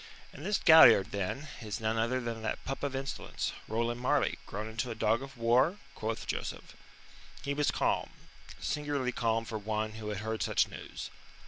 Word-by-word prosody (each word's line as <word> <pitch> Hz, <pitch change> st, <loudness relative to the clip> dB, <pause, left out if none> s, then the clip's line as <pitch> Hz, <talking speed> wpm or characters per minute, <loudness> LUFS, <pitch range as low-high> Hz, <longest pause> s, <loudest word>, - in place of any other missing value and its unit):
"And 145 Hz, -, -10 dB
this 205 Hz, +3 st, +1 dB
Galliard, 120 Hz, -, +8 dB
then, 100 Hz, +9 st, -3 dB
is 110 Hz, 0 st, -4 dB
none 110 Hz, 0 st, 0 dB
other 115 Hz, +3 st, +1 dB
than 115 Hz, -2 st, -4 dB
that 110 Hz, -, -3 dB
pup 135 Hz, -, -4 dB
of 140 Hz, -2 st, -2 dB
insolence, 135 Hz, +1 st, -3 dB
Roland 120 Hz, +2 st, -1 dB
Marleigh, 125 Hz, -, +2 dB
grown 105 Hz, +2 st, -4 dB
into 115 Hz, +3 st, -3 dB
a 115 Hz, -, -4 dB
dog 110 Hz, +2 st, +2 dB
of 135 Hz, -1 st, -9 dB
war?" 125 Hz, +9 st, +3 dB, 0.2 s
quoth 110 Hz, -2 st, -3 dB
Joseph. -, -, -5 dB, 0.7 s
He 140 Hz, +1 st, -1 dB
was 145 Hz, 0 st, +1 dB
calm -, -, 0 dB, 0.5 s
singularly 145 Hz, -, -1 dB
calm 115 Hz, -1 st, 0 dB
for 110 Hz, -1 st, -4 dB
one 110 Hz, +1 st, -2 dB
who 110 Hz, 0 st, -6 dB
had 105 Hz, -, -3 dB
heard 110 Hz, 0 st, -3 dB
such -, -, +2 dB
news. -, -, -8 dB
115 Hz, 180 wpm, -31 LUFS, 110-135 Hz, 0.7 s, Galliard